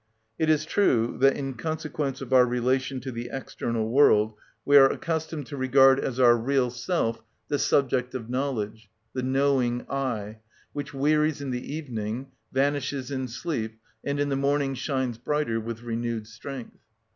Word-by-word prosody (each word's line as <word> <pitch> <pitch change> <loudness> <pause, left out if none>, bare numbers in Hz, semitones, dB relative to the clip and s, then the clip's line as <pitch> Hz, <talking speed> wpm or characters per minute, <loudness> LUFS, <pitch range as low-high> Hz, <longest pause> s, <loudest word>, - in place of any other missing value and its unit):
It 160 - +2
is 155 0 +3
true 130 - +2
that, 135 +1 +4
in 135 -1 -3
consequence 150 0 -3
of 130 -1 -4
our 125 -1 +7
relation 130 +2 0
to 130 - -5
the 120 0 -5
external 115 -4 -3
world, 110 -4 +4 0.3
we 145 - +4
are 135 -1 +9
accustomed 160 -2 -3
to 140 +4 -7
regard 135 +1 +5
as 130 -2 -3
our 120 -2 +7
real 125 +1 +1
self 120 -3 -1 0.3
the 145 - 0
subject 130 -2 +1
of 115 -3 -5
knowledge, 115 -5 -3 0.2
the 130 - -2
knowing 130 -2 +1
I, 115 -6 -3 0.3
which 145 0 -5
wearies 150 +2 +2
in 140 -2 -4
the 125 +3 -4
evening, 125 -3 -4 0.2
vanishes 140 0 0
in 130 -1 -2
sleep, 115 -4 -4 0.2
and 140 0 -2
in 145 0 +1
the 135 - 0
morning 140 0 +1
shines 130 -3 -2
brighter 125 -3 0
with 115 +1 -6
renewed 115 -1 -3
strength. 120 +3 -9
130 Hz, 160 wpm, -26 LUFS, 120-140 Hz, 0.3 s, are